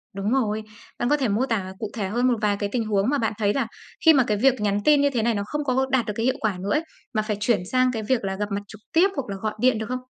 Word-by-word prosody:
đúng 200 Hz, +3 st, -2 dB
rồi, 220 Hz, -5 st, 0 dB, 0.4 s
bạn 240 Hz, -, 0 dB
có 295 Hz, -, +4 dB
thể 265 Hz, -, 0 dB
mô 215 Hz, +5 st, +1 dB
tả 195 Hz, -7 st, -2 dB
cụ 215 Hz, -, -4 dB
thể 205 Hz, -4 st, -2 dB
hơn 240 Hz, +5 st, +1 dB
một 245 Hz, -2 st, +2 dB
vài 205 Hz, -1 st, +1 dB
cái 205 Hz, -, -1 dB
tình 230 Hz, -3 st, -1 dB
huống 205 Hz, +1 st, +1 dB
mà 290 Hz, -, +2 dB
bạn 225 Hz, -3 st, 0 dB
thấy 205 Hz, -2 st, +1 dB
là 275 Hz, -, 0 dB, 0.4 s
khi 320 Hz, -, +9 dB
mà 265 Hz, -, +5 dB
cái 210 Hz, -, +1 dB
việc 260 Hz, +1 st, +3 dB
nhắn 205 Hz, -1 st, +1 dB
tin 295 Hz, -1 st, +5 dB
như 285 Hz, -, +3 dB
thế 245 Hz, -5 st, -1 dB
này 235 Hz, 0 st, +2 dB
nó 200 Hz, -1 st, -2 dB
không 295 Hz, +7 st, -3 dB
có 265 Hz, -1 st, +1 dB
đạt 255 Hz, -3 st, +2 dB
được 210 Hz, -, -3 dB
cái 225 Hz, -, -1 dB
hiệu 260 Hz, -, +2 dB
quả 210 Hz, -4 st, -1 dB
nữa 195 Hz, +2 st, -3 dB
ấy, 300 Hz, +2 st, +2 dB, 0.3 s
mà 215 Hz, -, +1 dB
phải 215 Hz, -1 st, -3 dB
chuyển 210 Hz, 0 st, +2 dB
sang 255 Hz, 0 st, +3 dB
cái 225 Hz, -3 st, -4 dB
việc 240 Hz, +1 st, 0 dB
là 190 Hz, -1 st, -2 dB
gặp 210 Hz, +1 st, -4 dB
mặt 200 Hz, 0 st, -1 dB
trực 215 Hz, -1 st, -13 dB
tiếp, 355 Hz, +4 st, +5 dB
hoặc 275 Hz, -4 st, -2 dB
là 195 Hz, -, -3 dB
gọi 215 Hz, -1 st, -1 dB
điện 250 Hz, -1 st, +3 dB
được 220 Hz, -, -3 dB
không? 255 Hz, 0 st, -2 dB
225 Hz, 325 wpm, -24 LUFS, 210-255 Hz, 0.4 s, khi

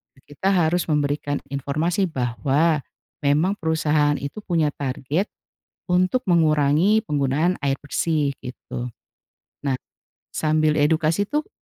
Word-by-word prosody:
eee, 130 Hz, -, -23 dB
kita 190 Hz, -, -2 dB
harus 175 Hz, 0 st, +2 dB
memberikan 145 Hz, -1 st, 0 dB, 0.2 s
informasi 160 Hz, +8 st, 0 dB
bahwa, 135 Hz, +5 st, +1 dB, 0.4 s
memang 155 Hz, +8 st, +2 dB
perusahaan 155 Hz, -2 st, +2 dB
itu 140 Hz, +8 st, -5 dB
punya 160 Hz, -4 st, +1 dB
target, 140 Hz, +7 st, -2 dB, 0.6 s
untuk 185 Hz, +8 st, +1 dB
mengurangi 165 Hz, +4 st, +3 dB
penggunaan 150 Hz, +4 st, 0 dB
air 140 Hz, -1 st, 0 dB
bersih 145 Hz, 0 st, 0 dB
gitu, 125 Hz, 0 st, -6 dB, 0.8 s
nah, 140 Hz, -, +1 dB, 0.6 s
sambil 155 Hz, -1 st, +2 dB
edukasi 155 Hz, +4 st, +2 dB
tuh 295 Hz, -, -2 dB
155 Hz, 110 wpm, -23 LUFS, 140-170 Hz, 0.8 s, mengurangi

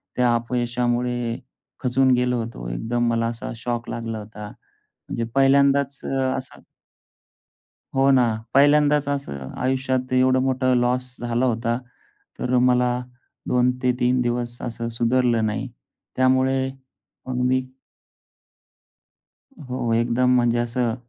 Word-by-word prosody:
त्या 125 Hz, -1 st, +3 dB
अपयशामुळे 120 Hz, 0 st, -1 dB, 0.4 s
खचून 130 Hz, +1 st, +3 dB
गेलो 125 Hz, 0 st, +1 dB
होतो. -, -, -8 dB
एकदम 120 Hz, -, -1 dB
मला 115 Hz, 0 st, +1 dB
असा 115 Hz, 0 st, -5 dB
शॉक 120 Hz, 0 st, -3 dB
लागला 115 Hz, -1 st, -4 dB
होता. 105 Hz, 0 st, -9 dB
म्हणजे 115 Hz, -, -9 dB
पहिल्यांदाच 140 Hz, 0 st, +3 dB
अ, -, -, -3 dB, 0.2 s
असा 130 Hz, -, -7 dB, 1.4 s
हो 135 Hz, +1 st, +4 dB
ना. 130 Hz, -2 st, +5 dB, 0.3 s
पहिल्यांदाच 145 Hz, +1 st, +4 dB
असं 105 Hz, -, -4 dB
आयुष्यात 130 Hz, 0 st, -1 dB
एवढं 130 Hz, 0 st, +4 dB
मोठं 130 Hz, -1 st, +1 dB
लॉस 125 Hz, +1 st, 0 dB
झाला 120 Hz, +1 st, 0 dB
होता. 115 Hz, 0 st, 0 dB, 0.6 s
तर 125 Hz, 0 st, 0 dB
मला 125 Hz, 0 st, +3 dB, 0.5 s
2 125 Hz, 0 st, +3 dB
ते 125 Hz, -1 st, +3 dB
3 125 Hz, +1 st, +2 dB
दिवस 120 Hz, 0 st, -2 dB
असं 115 Hz, -1 st, -4 dB
सुधारलं 120 Hz, -2 st, +2 dB
नाही. 110 Hz, +5 st, -3 dB, 0.5 s
त्यामुळे 130 Hz, +1 st, +2 dB, 0.6 s
मग 125 Hz, -1 st, -2 dB
मी 130 Hz, 0 st, +2 dB, 2.1 s
हो 125 Hz, -2 st, -2 dB
एकदम 120 Hz, +2 st, +2 dB
म्हणजे 120 Hz, -1 st, +2 dB
असं 120 Hz, 0 st, 0 dB
125 Hz, 115 wpm, -23 LUFS, 120-130 Hz, 2.1 s, ना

